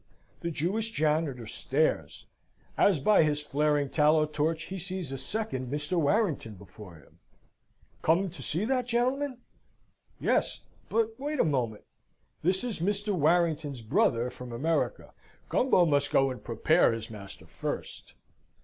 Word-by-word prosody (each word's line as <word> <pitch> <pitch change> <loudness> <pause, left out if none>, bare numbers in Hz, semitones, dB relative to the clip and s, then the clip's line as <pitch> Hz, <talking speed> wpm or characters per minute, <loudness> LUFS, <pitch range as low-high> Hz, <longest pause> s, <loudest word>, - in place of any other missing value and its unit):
The 170 - -3
Jewish 190 +8 -1
janitor 150 - 0
stares, - - -1 0.5
as 190 -7 +4
by 210 +10 +5
his 150 -2 +2
flaring 150 0 +1
tallow 155 +2 +3
torch 155 +2 -1
he 190 +2 -6
sees 185 -4 -5
a 135 - -3
second 135 - -4
Mr. 150 +4 -2
Warrington 160 - +1
before 95 -1 -13
him. 75 - -20 0.8
Come 175 +3 +2
to 180 - -10
see 175 +7 -2
that 250 0 0
gentleman? 255 +2 0 0.8
Yes. - - +1 0.3
But 225 0 +1
wait 295 +1 -3
a - - +4
moment. 120 -8 -1 0.6
This 185 +5 +1
is 240 -7 -3
Mr. 205 +3 0
Warrington's 155 -5 +1
brother 115 +2 +2
from 125 -1 -9
America. 160 - -1 0.4
Gumbo 215 -9 +4
must 145 -2 +2
go 135 0 +3
and 125 - -8
prepare 120 +5 +3
his 115 0 -6
master 100 -6 -10
first. 80 -3 -6
155 Hz, 140 wpm, -29 LUFS, 135-195 Hz, 0.8 s, by